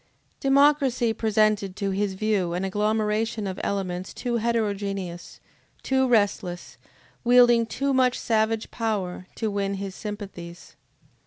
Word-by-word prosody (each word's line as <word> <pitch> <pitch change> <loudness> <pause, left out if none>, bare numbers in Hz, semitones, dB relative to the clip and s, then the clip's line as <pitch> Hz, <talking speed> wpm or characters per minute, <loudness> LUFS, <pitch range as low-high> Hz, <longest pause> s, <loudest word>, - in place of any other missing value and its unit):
Democracy 275 -4 +3
presented 215 -3 +1
to 200 -2 -2
his 195 0 -1
view 195 -4 0
an 185 +2 -1
agglomeration 215 +2 0
of 190 -1 -4
elements 185 -2 -3
too 240 -1 -2
heterogeneous, 200 -6 -2 0.4
too 265 0 +2
restless, 205 -6 0 0.4
wielding 240 -1 +5
too 275 +3 -1
much 255 -1 +3
savage 220 0 0
power, 195 -6 -3
to 220 -2 -2
win 200 -1 -1
his 195 -1 -5
sympathies. 190 -5 -8
210 Hz, 115 wpm, -25 LUFS, 195-235 Hz, 0.4 s, wielding